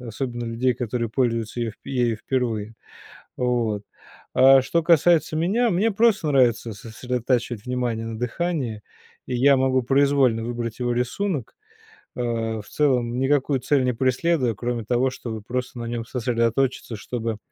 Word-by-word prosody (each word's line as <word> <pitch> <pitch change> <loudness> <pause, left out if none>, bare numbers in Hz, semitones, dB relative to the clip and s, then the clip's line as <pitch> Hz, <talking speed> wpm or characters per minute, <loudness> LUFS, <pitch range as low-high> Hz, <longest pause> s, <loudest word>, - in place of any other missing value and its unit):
Особенно 120 0 -4
людей, 120 +2 0
которые 120 -1 -2
пользуются 115 -2 -1
ее 115 -3 -2
ею 125 -4 0
впервые. 115 -3 -2 0.6
Вот. 120 -5 0 0.5
А 135 0 +7
что 170 +6 0
касается 165 -1 +3
меня, 210 +9 +2
мне 205 +5 +1
просто 210 -6 +2
нравится 120 -4 +2
сосредотачивать 120 +1 -2
внимание 120 -3 -2
на 115 -1 -5
дыхании, 125 -3 -2 0.4
и 125 - -2
я 135 +2 +5
могу 130 0 +2
произвольно 135 -3 +3
выбрать 120 0 -4
его 120 -1 0
рисунок, 130 - -2 0.6
э, 125 - -2
в 115 -3 -2
целом 125 -5 +1
никакую 135 0 +2
цель 140 -1 +2
не 125 - +2
преследуя, 130 +1 +1
кроме 120 +2 -3
того, 125 +4 +1
чтобы 110 -4 -6
просто 125 +3 -4
на 120 - -4
нём 115 0 -3
сосредоточиться, 120 +1 -1
чтобы 115 0 -4
125 Hz, 140 wpm, -23 LUFS, 115-135 Hz, 0.6 s, А